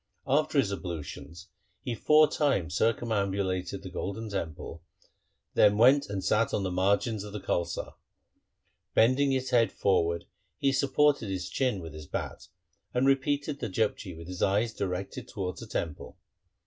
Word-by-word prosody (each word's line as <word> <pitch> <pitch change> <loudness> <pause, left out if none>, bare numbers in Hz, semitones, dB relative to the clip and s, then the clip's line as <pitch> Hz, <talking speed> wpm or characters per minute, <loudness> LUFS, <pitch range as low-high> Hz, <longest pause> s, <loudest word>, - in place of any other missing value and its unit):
After 150 +2 +1
his 110 -8 +3
ablutions 85 -1 -7 0.3
he 120 - -2
four 150 +7 +5
times 140 - 0
circumambulated 100 -5 0
the 95 - -8
Golden 100 +4 -4
Temple, 85 -6 -5 0.2
and - - -34 0.4
then 105 0 +5
went 135 +5 +5
and 100 -2 -3
sat 110 +3 +2
on 100 - -1
the 95 - -2
margin 100 +3 +1
of 105 - -8
the 105 - -4
Kaulsar. 85 -2 -2 1.0
Bending 130 +5 +4
his 130 -1 -1
head 115 -2 +4
forward 85 -3 +1 0.3
he 140 - +2
supported 140 -3 +2
his 95 -2 -3
chin 125 -8 0
with 80 -2 -8
his 75 -1 -9
bat, - - -5 0.5
and 125 +2 +3
repeated 140 +1 +1
the 115 - -3
Japji 95 -3 -1
with 85 0 -10
his 90 -1 -6
eyes 105 +3 +2
directed 100 +7 -4
towards 95 -6 -4
the - - -8
Temple. 80 -4 -4
105 Hz, 155 wpm, -29 LUFS, 90-130 Hz, 1.0 s, four